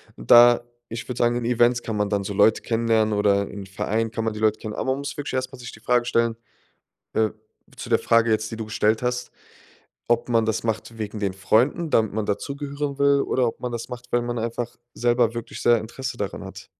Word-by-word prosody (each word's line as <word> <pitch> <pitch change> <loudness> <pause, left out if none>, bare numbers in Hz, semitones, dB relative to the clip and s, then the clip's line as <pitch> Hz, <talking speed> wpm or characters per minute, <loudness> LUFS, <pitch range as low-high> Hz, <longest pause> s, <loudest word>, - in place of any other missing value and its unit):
Und - - -6
da, 120 0 +8 0.3
ich 115 +1 -6
würde 125 -1 -5
sagen, 120 0 +2
in 120 -1 -2
Events 120 0 +3
kann 110 - -3
man 105 -1 0
dann 100 -1 0
so 100 - -4
Leute 105 +2 +4
kennenlernen 115 -2 +1
oder 100 -1 +2
in 100 -1 -8
Vereinen 110 +4 -1
kann 115 0 -3
man 110 - -1
die 105 - -7
Leute 110 0 +2
kennen. 105 -1 -6
Aber - - -3
man 135 - -1
muss 140 0 -5
wirklich 145 -1 -5
erst 130 0 -2
mal 130 - -11
sich 120 - -8
die 110 - -13
Frage 120 +1 +1
stellen, 115 -1 +1 0.8
äh 110 -1 +2 0.5
zu - - -7
der - - +4
Frage 115 0 +3
jetzt, 110 0 0
die 115 - -5
du 110 -1 -5
gestellt 110 0 +1
hast, 125 0 -2 0.8
ob 120 +1 +1
man 115 -2 +3
das 110 0 -1
macht 115 0 -3
wegen 105 0 -4
den 100 -2 -1
Freunden, 120 - +1
damit 110 -7 +2
man 110 -1 -2
dazugehören 140 +5 -3
will 140 0 +4
oder 125 -2 +1
ob 115 - -5
man 125 -1 -4
das 115 -1 -5
macht, 125 0 -9
weil 120 - +2
man 120 0 -3
einfach 115 +1 -3 0.2
selber 120 -1 +2
wirklich 120 -1 -6
sehr 120 -1 +5
Interesse 130 +4 -6
daran 100 -4 -4
hat. - - -10
115 Hz, 230 wpm, -24 LUFS, 110-125 Hz, 0.8 s, da